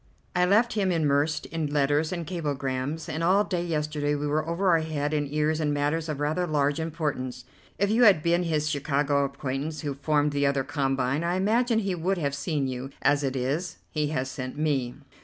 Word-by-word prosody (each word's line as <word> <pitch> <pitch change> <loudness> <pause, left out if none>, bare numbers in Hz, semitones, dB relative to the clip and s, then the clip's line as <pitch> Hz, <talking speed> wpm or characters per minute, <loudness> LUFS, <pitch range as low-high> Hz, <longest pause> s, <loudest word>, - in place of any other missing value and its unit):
I 180 0 +4
left 220 +6 +3
him 200 -3 +1
immersed 150 -2 +1
in 160 -2 -3
letters 145 +2 +1
and 170 -2 -3
cablegrams, 145 -3 -3
and 160 +2 -3
all 190 +4 +4
day 180 -4 -2
yesterday 150 -3 -1
we 145 0 -2
were 155 +2 0
over 175 +1 +3
head 155 -2 -2
and 145 -2 -1
ears 155 +1 +1
in 150 -1 +1
matters 150 +3 0
of 150 -2 -3
rather 155 +5 0
large 145 -1 +1
importance. 145 -6 -3 0.3
If 200 +1 +1
you 235 +3 +4
had 185 -8 +6
been 170 +1 +3
his 155 -3 0
Chicago 145 -1 +1
acquaintance 140 +2 -4
who 145 -2 -2
formed 145 +1 +1
the 145 0 +1
other 140 -1 +1
combine, 135 0 0
I 175 +1 0
imagine 225 +5 +2
he 195 -4 0
would 180 +3 -1
have 140 -4 -1
seen 140 0 -1
you; 130 +1 -4
as 145 +1 +3
it 135 -1 -1
is, 140 +8 -2
he 150 -1 0
has 135 -3 -2
sent 130 +1 -6
me." 140 -5 0
150 Hz, 195 wpm, -27 LUFS, 140-170 Hz, 0.3 s, had